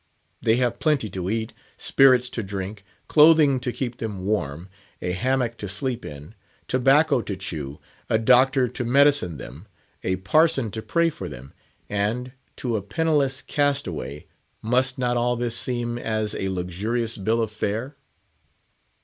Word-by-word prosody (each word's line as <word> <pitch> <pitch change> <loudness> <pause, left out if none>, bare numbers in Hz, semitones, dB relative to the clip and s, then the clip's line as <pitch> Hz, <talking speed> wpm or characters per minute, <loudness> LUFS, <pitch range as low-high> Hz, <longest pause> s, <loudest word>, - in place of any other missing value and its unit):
They 110 - +3
have 120 -1 0
plenty 145 - +1
to 90 0 -3
eat; 110 +1 -2 0.2
spirits 130 -2 +4
to 115 - -4
drink; 100 0 -6 0.2
clothing 150 -3 +6
to 125 0 -2
keep 120 -1 -4
them 100 -5 -5
warm; 85 -5 -2 0.3
a 90 - -2
hammock 120 +3 0
to 105 - -5
sleep 120 +5 -3
in; 75 +6 -9 0.3
tobacco 135 +2 +3
to 100 - -4
chew; 75 -7 -5 0.3
a 110 - +3
doctor 130 +3 +4
to 125 +1 -5
medicine 135 - +3
them; 70 +10 -10 0.4
a 95 - 0
parson 135 - +2
to 110 - -5
pray 170 +6 +1
for 95 - -7
them; 65 0 -11 0.3
and, 110 +5 -2 0.2
to 120 -3 -2
a - - -3
penniless 140 - 0
castaway, 95 - -2 0.4
must 125 +3 +1
not 125 -1 0
all 120 +1 +1
this 120 -1 -1
seem 120 -1 -1
as 110 -2 -2
a 95 - -2
luxurious 100 +6 -2
Bill 110 +4 0
of 110 -2 -1
Fare? 110 +6 -3
115 Hz, 150 wpm, -24 LUFS, 100-130 Hz, 0.4 s, clothing